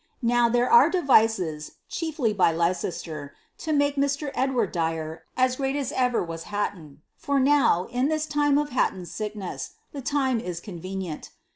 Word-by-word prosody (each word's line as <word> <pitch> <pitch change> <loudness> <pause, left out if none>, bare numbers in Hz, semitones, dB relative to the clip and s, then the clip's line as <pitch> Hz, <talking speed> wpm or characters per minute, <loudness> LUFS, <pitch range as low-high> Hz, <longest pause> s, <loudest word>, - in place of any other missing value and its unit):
Now, 240 0 +3
there 245 +1 +2
are 470 - +7
devices 220 - +2
^chiefly 305 - -2
by 185 -4 +4
Leicester) 165 -3 -2 0.2
to 320 - -3
make 285 -1 +2
Mr. 280 +1 0
Edward 255 -6 0
Dyer 160 -1 -3
as 255 0 +2
great 270 0 -1
as 285 -2 -2
ever 250 -2 +1
was 165 -1 -6
Hatton: 165 -8 -4
for 280 -1 0
now, 270 -10 +4
in 250 +2 +1
this 310 0 0
time 290 -1 +2
of 295 0 0
Hatton's 185 -8 -1
sickness, 210 0 -5 0.2
the 285 - -6
time 265 -3 +1
is 180 -6 -5
con 175 -1 -9
venient. 185 -4 -5
235 Hz, 160 wpm, -25 LUFS, 175-280 Hz, 0.2 s, are